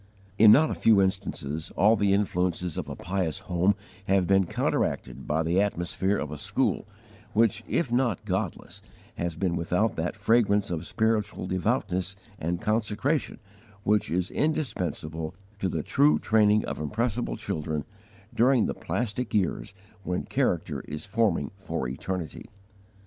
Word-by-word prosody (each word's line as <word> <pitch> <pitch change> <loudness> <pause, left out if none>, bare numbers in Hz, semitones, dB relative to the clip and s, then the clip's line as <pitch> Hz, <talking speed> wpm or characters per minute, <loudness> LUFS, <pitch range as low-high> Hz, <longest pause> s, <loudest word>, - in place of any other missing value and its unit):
In 105 0 +9
not 150 +8 +6
a - - 0
few 110 -3 +4
instances, 95 -6 -1
all 105 +5 +5
the 100 -2 +2
influences 90 -4 0
of - - -4
a - - -5
pious 90 -2 -2
home 90 +1 +2 0.3
have 95 -1 +3
been 95 0 +3
counteracted - - -1
by 80 +2 +1
the 85 +4 +2
atmosphere 95 0 0
of 75 - -4
a 75 - -6
school - - 0 0.5
which, 115 0 +2
if 140 -8 0
not 120 -5 +1
godless, 95 -2 -3 0.4
has 85 -2 -2
been 85 0 0
without 90 +6 0
that 80 +2 -2
fragrance 105 -2 +2
of 85 0 -3
spiritual 110 -4 0
devoutness 95 -1 -1 0.2
and 85 +2 -2
consecration 110 +7 0 0.5
which 105 0 +2
is 90 +2 -1
indispensable 90 - -2 0.2
to 95 - 0
the 80 -3 -2
true 75 +1 +4
training 105 +2 +3
of - - -4
impressible 115 +9 -1
children 75 -1 -3 0.5
during 125 0 +4
the - - -1
plastic 120 0 -3
years 95 -1 -1 0.3
when 90 -1 -2
character - - -1
is 75 +1 -6
forming 105 -8 +1
for 80 -8 -3
eternity! 80 +6 -5
95 Hz, 145 wpm, -27 LUFS, 85-110 Hz, 0.5 s, In